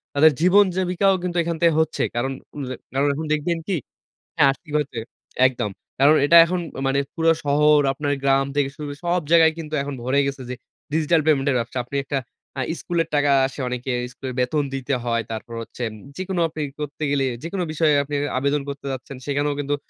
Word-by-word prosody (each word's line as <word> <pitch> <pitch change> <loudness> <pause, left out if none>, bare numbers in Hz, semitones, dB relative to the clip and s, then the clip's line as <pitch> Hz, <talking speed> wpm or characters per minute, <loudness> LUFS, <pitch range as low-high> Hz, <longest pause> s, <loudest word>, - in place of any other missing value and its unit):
তাদের 155 +2 +7
জীবন 200 +3 +6
জীবিকাও 185 +1 +2
কিন্তু 180 -1 -2
এখান 165 0 -2
থেকে 170 - +6
হচ্ছে। 160 -1 0
কারণ 130 +3 0 0.2
উম 145 - -4 0.3
কারণ 140 +2 +2
এখন 155 +3 -4
দেখবেন 165 +3 0
কী? 195 - 0 0.6
হ্যাঁ, - - +5
আর্থিক 145 +3 -8
ওয়ে 150 -2 +1
তে 120 - -5 0.5
একদম। 120 -5 -2 0.3
কারণ 145 +3 +7
এটা 170 - +6
এখন 180 +1 -1 0.3
মানে 135 +1 +1 0.2
পুরো 165 0 +3
শহর, 150 +1 +4
আপনার 145 +1 -2
গ্রাম 135 0 +3
থেকে 145 -2 +2
শুরু 150 -1 -6
সব 175 +1 +1
জায়গায় 165 -1 +6
কিন্তু 155 -1 -6
এখন 140 0 -5
ভরে 130 +3 +1
গেছে 140 -1 -4
যে - - -2 0.4
ডিজিটাল 160 +1 +3
পেমেন্টের 140 -3 +3
ব্যবসা। 120 +2 -3
আপনি 140 - -5
একটা 140 0 -1 0.4
আ - - 0 0.2
স্কুলের 170 -2 -1
টাকা 145 -1 +3 0.2
আসে 135 +2 -8
অনেকের, 125 0 -2
স্কুলের 130 0 -6
বেতন 145 +4 +1
দিতে 135 0 -1
হয়, 115 -1 0
তারপর 115 +1 -6
হচ্ছে 120 - -9 0.3
যেকোনো 185 -1 -2
আপনি 155 - -8
ই - - -12
করতে 150 +1 -6
গেলেই, 135 -2 +1
যেকোনো 180 +2 -3
বিষয়ে 155 -1 +3
আপনি 145 +1 -6 0.2
আবেদন 140 +2 0
করতে 140 0 -6
যাচ্ছেন, 130 +1 -7
সেখানেও 145 0 0
কিন্তু 145 0 -1
145 Hz, 195 wpm, -22 LUFS, 135-160 Hz, 0.6 s, তাদের